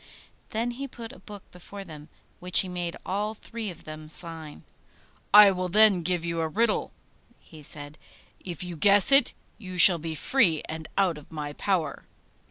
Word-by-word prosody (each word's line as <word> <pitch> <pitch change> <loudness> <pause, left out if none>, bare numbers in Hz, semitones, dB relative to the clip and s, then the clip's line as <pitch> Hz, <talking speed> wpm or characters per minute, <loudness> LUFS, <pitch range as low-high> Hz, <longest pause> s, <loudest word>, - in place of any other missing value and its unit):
Then 230 +2 -3
he 275 +3 -7
put 235 -1 -11
a - - -16
book 205 -2 -12
before 195 +3 -12
them, 155 -3 -13 0.3
which 180 0 +2
he 190 - -6
made 175 -2 -6
all 210 +3 -4
three 225 0 -8
of 175 -2 -12
them 155 0 -11
sign. 160 -2 -4 0.7
'I 205 -1 +8
will 185 -1 -4
then 210 -1 +4
give 175 0 -3
you 170 0 -4
a 160 - -2
riddle,' 215 +6 -1 0.5
he 155 -2 -16
said; 145 +1 -6 0.4
'if 175 -2 -8
you 175 -1 -8
guess 200 - +3
it, 275 -2 +5 0.2
you 185 -4 -10
shall 175 0 +10
be 160 0 -6
free 170 - +1
and 160 0 -8
out 180 -6 0
of 150 - -20
my 150 -2 -7
power. 165 -5 -3
180 Hz, 175 wpm, -25 LUFS, 160-205 Hz, 0.7 s, shall